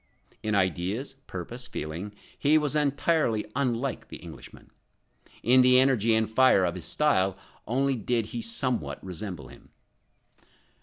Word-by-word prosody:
In 110 -1 -1
ideas, 95 - -1
purpose, 120 +8 -6
feeling, 90 +7 -6 0.2
he 150 +2 +3
was 150 -1 0
entirely 145 -5 +1
unlike 130 -1 -1
the - - -8
Englishman; - - -12 0.7
in 130 +2 +6
the 125 0 +6
energy 120 -4 +3
and 110 0 +2
fire 110 -5 +4
of 85 - -1
his 90 -3 -7
style 95 -11 +1 0.3
only 135 +3 +1
did 115 0 -1
he 115 +2 -5
somewhat 115 - -2
resemble 90 - -6
him. - - -16
115 Hz, 135 wpm, -27 LUFS, 95-130 Hz, 0.7 s, in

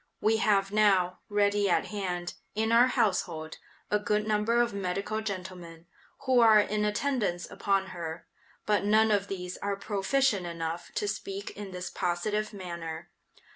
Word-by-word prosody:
We 220 +1 +3
have 200 -3 +2
now, 195 -4 +3
ready 205 -1 +2
at - - +2
hand, 180 -4 -3 0.2
in 220 +1 0
our 235 +2 +6
household, 170 -8 -1 0.3
a 210 - +3
good 210 0 0
number 215 +2 +2
of 240 -3 +2
medical 200 +3 -2
gentlemen, 180 -5 -7 0.4
who 260 -2 +3
are 220 -2 +7
in 210 0 0
attendance 210 -5 -1
upon 195 -1 0
her, 165 -1 -6 0.4
but 210 -2 +2
none 215 +2 +4
of 200 -1 +1
these 180 -2 -5
are 200 0 -2
proficient 205 +1 0
enough 170 0 -4
to 205 - -1
speak 200 0 -4
in 205 -1 -8
this 180 0 -5
positive 205 +4 -1
manner. 170 -4 -7
200 Hz, 150 wpm, -29 LUFS, 180-215 Hz, 0.4 s, are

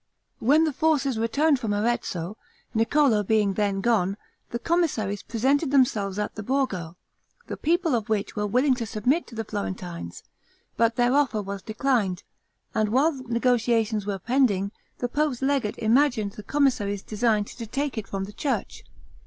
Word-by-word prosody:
When 290 +7 +4
the 310 -2 0
forces 280 -6 +1
returned 280 +6 +2
from 220 -4 -1
Arezzo, 205 -4 -1 0.4
Niccolo 230 0 +3
being 205 -1 +2
then 200 -1 0
gone, 200 -4 +1 0.3
the 235 - -3
commissaries 240 - 0
presented 270 +6 +1
themselves 230 -8 +2
at 210 0 -2
the 215 - -6
Borgo, 200 -9 -2 0.5
the - - -5
people 335 0 +1
of 225 -3 -1
which 210 -1 -1
were 210 -1 -1
willing 255 +6 +3
to 230 -3 -3
submit 245 +11 0
to 235 - -12
the 225 - -2
Florentines; 185 - -5 0.5
but 230 0 +2
their 245 +1 +2
offer 275 -6 +2
was 200 0 -5
declined, 220 -5 0 0.5
and 215 -3 +1
while 270 +8 +3
negotiations 235 -4 0
were 200 -1 -1
pending, 200 -3 +1 0.3
the 245 - -1
pope's 285 -1 -1
legate 270 -6 0
imagined 230 -2 +2
the 210 - -9
commissaries 205 -6 0
designed 215 -1 +1
to 230 +2 -8
take 275 +3 -2
it 215 -4 -4
from 195 -1 -3
the 200 +2 -8
church. 245 -3 -3
230 Hz, 160 wpm, -25 LUFS, 205-270 Hz, 0.5 s, When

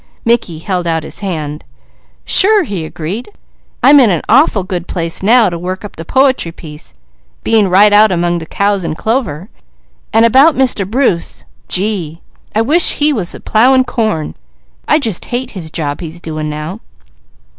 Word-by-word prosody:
Mickey 230 -8 0
held 180 +1 -3
out 165 -1 -1
his - - -7
hand. 155 -6 -5 0.6
"Sure!" 415 0 +4
he 200 - -5
agreed. 175 - -6 0.5
"I'm 290 +1 +7
in 245 -5 +5
an 175 -5 -1
awful 235 - +3
good 180 -2 -5
place 165 -2 -3
now 225 +3 +4
to 170 - -5
work 185 +3 -5
up 205 - -10
the 165 - -8
poetry 260 - +1
piece, 155 -2 -12 0.5
being 215 -4 +2
right 205 +3 +5
out 210 0 +5
among 175 -1 0
the 160 - -9
cows 200 0 -1
and 160 -1 -4
clover. 215 - -2 0.6
And 225 +1 +4
about 275 +7 +5
Mr. 250 -7 0
Bruce, 225 -8 -1 0.2
gee! 180 -5 -2 0.4
I 220 - +2
wish 315 +8 +5
he 300 +1 +1
was 190 -9 -3
plowing 255 +4 +4
corn. 220 -11 -2 0.5
I - - +4
just 225 - -3
hate 250 +1 -4
his 175 -6 -7
job 145 -2 -4
he's 165 0 -8
doing 155 -2 -5
now. 150 +7 -6
195 Hz, 165 wpm, -13 LUFS, 165-235 Hz, 0.6 s, I'm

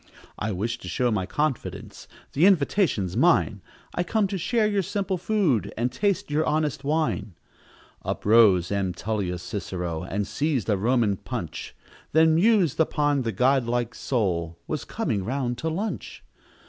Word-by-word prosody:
"I 110 0 -1
wish 115 +5 -2
to - - -10
show 125 -1 0
my 95 -4 -1
confidence 150 -4 -3 0.3
The 160 +7 +5
invitation's 150 - +2
mine - - +3 0.3
I - - -1
come 210 +4 +1
to 195 - -2
share 220 +5 +1
your 205 -2 +1
simple 195 0 -2
food, 170 - +1
And 120 +2 0
taste 200 -7 -1
your 155 +2 +2
honest 155 -2 0
wine." 150 - -1 0.7
Up - - -4
rose 100 -5 +5
M. 95 -3 -1
Tullius 90 -3 -3
Cicero, 90 -6 -4
And 100 +3 -2
seized 140 -1 -1
a 105 - +4
Roman 110 -1 +1
punch, - - -6 0.4
Then 160 +1 +5
mused 180 - +3
upon 145 -3 +2
the 115 -2 -1
god 130 +5 +2
like 120 0 -1
soul 85 -9 -1
Was 155 - -4
coming 120 - -2
round 125 +1 -2
to 160 - -1
lunch. 195 +7 -4
125 Hz, 155 wpm, -25 LUFS, 105-160 Hz, 0.7 s, The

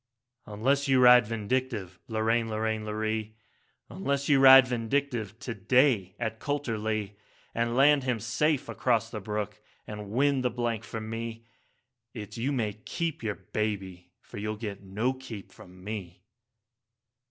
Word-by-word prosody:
3 105 - -10
'Unless 140 +6 +1
you 135 -1 +4
ride 125 -2 +7
Vindictive, 115 -4 -2
Lorraine, 115 +1 0
Lorraine, 110 0 -2
Lorree, 110 0 -3 0.5
Unless 140 +7 -2
you 140 -2 +5
ride 135 -1 +9
Vindictive 120 -3 -2
to 125 -1 -5
day 110 -3 +2
at 110 -2 -3
Coulterlee, 110 -7 -2 0.4
And 115 0 -1
land 140 +1 +5
him 125 -3 0
safe 130 +6 0
across 115 -2 0
the 105 - -5
brook, 105 +1 -4 0.2
and 105 -1 -7
win 135 +4 +2
the 125 - +1
blank 120 -2 -2
for 115 - -5
me, 115 +1 -6 0.7
It's 105 -3 -7
you 125 +4 -1
may 110 -6 -1
keep 160 - -4
your 110 -3 -2
baby, 95 -3 -4
for - - -10
you'll 105 +1 -3
get 105 -3 -6
no 105 +7 -1
keep 130 -6 -9
from 90 0 -15
me.' 95 -4 -7
115 Hz, 145 wpm, -28 LUFS, 105-130 Hz, 0.7 s, ride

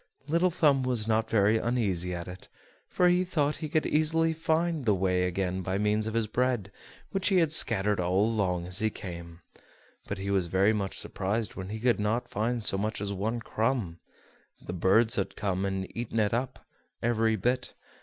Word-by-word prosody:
Little 170 +4 +2
Thumb 150 -6 +3
was 125 -4 -1
not 110 0 +1
very 105 0 +3
uneasy 100 -8 0
at 85 0 -6
it, 90 +1 -9 0.4
for 180 - +3
he 180 +1 +3
thought 150 -5 0
he 155 - -5
could 155 - +1
easily 160 +1 +2
find 160 -2 0
the 105 -3 +3
way 90 -1 +1
again 90 +1 -2
by 95 +1 -2
means 105 +1 +1
of 110 - -4
his 115 -1 +1
bread, 120 -3 -1 0.4
which 195 -1 -1
he 195 - +3
had 165 -4 +3
scattered 105 - +3
all 90 +3 +2
along 95 -6 0
as 90 +2 0
he 110 - +1
came; 85 -4 -9 0.7
but 100 - -4
he 100 +1 -3
was 95 -3 +1
very 95 +5 +3
much 100 -3 -2
surprised 105 +4 -1
when 95 0 -7
he 110 +1 -5
could 120 -2 +2
not 115 +4 -1
find 115 +2 -1
so 95 - +1
much 110 +2 -2
as 100 0 -3
one 110 +5 -2
crumb; 110 -8 -2 0.6
the - - -7
birds 110 +6 +3
had 100 - -2
come 95 -2 -1
and 95 -1 -2
had - - -11
eaten 115 -1 -2
it 105 -1 +1
up, 125 +2 -3 0.4
every 115 -1 +2
bit. 125 +5 -1
110 Hz, 195 wpm, -28 LUFS, 95-125 Hz, 0.7 s, Thumb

